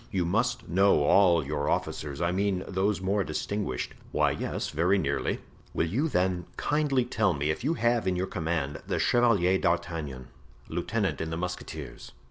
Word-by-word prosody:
You 95 -4 0
must 115 +8 0
know 95 -3 +4
all 85 -1 +5
your 75 0 -1
officers—I 75 +4 -1
mean 95 0 0
those 95 0 0
more 100 +2 +1
distinguished." 100 -14 -3 0.2
"Why, - - +2
yes, - - -3
very 90 +6 +2
nearly." 70 -6 -1 0.3
"Will - - +2
you 120 - 0
then 90 - 0
kindly 145 -4 +1
tell 110 -6 +1
me 75 +2 0
if 80 - -5
you 155 +5 +1
have 120 -6 +1
in 90 - +1
your 90 +1 0
command 80 -6 -2
the - - 0
Chevalier 100 -7 +3
d'Artagnan, 75 -7 -2 0.4
lieutenant 95 -4 -1
in 80 - -3
the 80 - -3
musketeers?" 90 -8 -6
90 Hz, 160 wpm, -28 LUFS, 80-105 Hz, 0.4 s, all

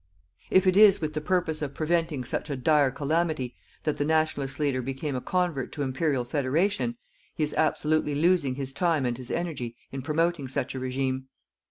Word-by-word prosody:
If 190 0 +4
it 185 -1 +4
is 205 -1 +7
with 155 -2 -3
the 155 - -2
purpose 170 -2 0
of 145 -2 -4
preventing 165 -4 0
such 130 - -3
a 140 - -1
dire 145 +2 +3
calamity 145 -1 -1 0.3
that 150 - -1
the - - +2
Nationalist 155 -3 0
leader 140 -4 +1
became 135 +3 -3
a 125 - -2
convert 175 -7 -1
to 145 - -2
Imperial 130 -1 0
Federation, 170 - 0 0.4
he 155 - 0
is 150 - -1
absolutely 155 -1 +1
losing 160 -4 +2
his 135 -1 -4
time 165 -4 +1
and 120 -1 0
his 125 0 -9
energy 145 -9 -3 0.2
in 135 - -4
promoting 160 +1 0
such 130 - -2
a 130 - -4
regime. 130 0 -2
150 Hz, 185 wpm, -27 LUFS, 130-165 Hz, 0.4 s, is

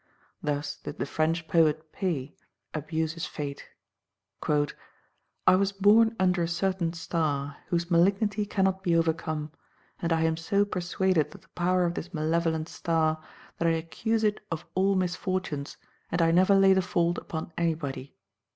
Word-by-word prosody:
Thus 145 0 -2
did - - -8
the 120 - -1
French 160 +3 0
poet 155 -1 +2
Pays 155 -8 -2 0.4
abuse 160 +1 -2
his 165 -1 -4
fate: 140 -2 -6 0.7
"I 150 +4 -1
was 195 +1 +2
born 215 +3 +5
under 180 -1 +3
a 170 - +1
certain 175 0 0
star, 145 -4 -2
whose 170 0 -1
malignity 200 +4 +2
cannot 190 -1 +1
be 175 -3 +1
overcome; 160 -2 0 0.5
and 170 - -1
I 165 0 +2
am 160 0 +1
so 200 +5 +1
persuaded 185 -3 0
of - - -13
the - - -25
power 180 +1 +1
of 170 - 0
this 175 +1 -6
malevolent 160 0 0
star, 160 -3 0 0.4
that 170 - +2
I 165 - +4
accuse 220 +8 -1
it 210 -1 +2
of 165 -2 -4
all 195 +1 +2
misfortunes, 180 -5 -2 0.3
and 175 - 0
I 165 -1 +4
never 185 +3 +5
lay 195 0 +6
the 190 - +3
fault 175 -1 0
upon 160 0 -6
anybody." 145 -5 -2
170 Hz, 155 wpm, -28 LUFS, 155-185 Hz, 0.7 s, lay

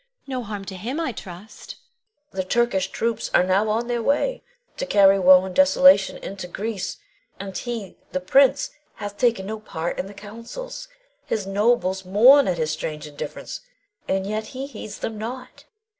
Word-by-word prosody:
No 260 -2 -3
harm 205 -3 -6
to 190 - -7
him, 240 - -4
I 320 -6 -1
trust? 200 0 -10 0.6
Queen. 190 - -2
The 185 - -8
Turkish 240 -5 +2
troops 230 0 -2
are - - +6
now 190 +4 +2
on 225 +3 0
their 240 -1 -1
way 290 - 0 0.4
to - - -3
carry 195 -1 +5
woe 185 0 +7
and 190 - -6
desolation 275 -5 +5
into 190 -2 -7
Greece, 200 +2 -4 0.4
and 195 -1 -7
he, 230 -6 -5
the 185 - -1
prince, 270 +9 +3 0.2
hath 205 -1 -7
taken 235 -6 +2
no 220 +2 -5
part 170 -5 -4
in 190 - -3
the 200 - -12
councils. 230 - -8 0.4
His 210 -3 -1
nobles 195 -2 +1
mourn 245 +10 +6
at 180 -2 0
his 155 -1 -1
strange 155 -1 -4
indifference, 145 -1 -7 0.5
and 190 0 0
yet 215 +2 -3
he 270 - -3
heeds 220 -6 -8
them 220 -1 -5
not. 250 +4 -7
210 Hz, 175 wpm, -23 LUFS, 190-240 Hz, 0.6 s, woe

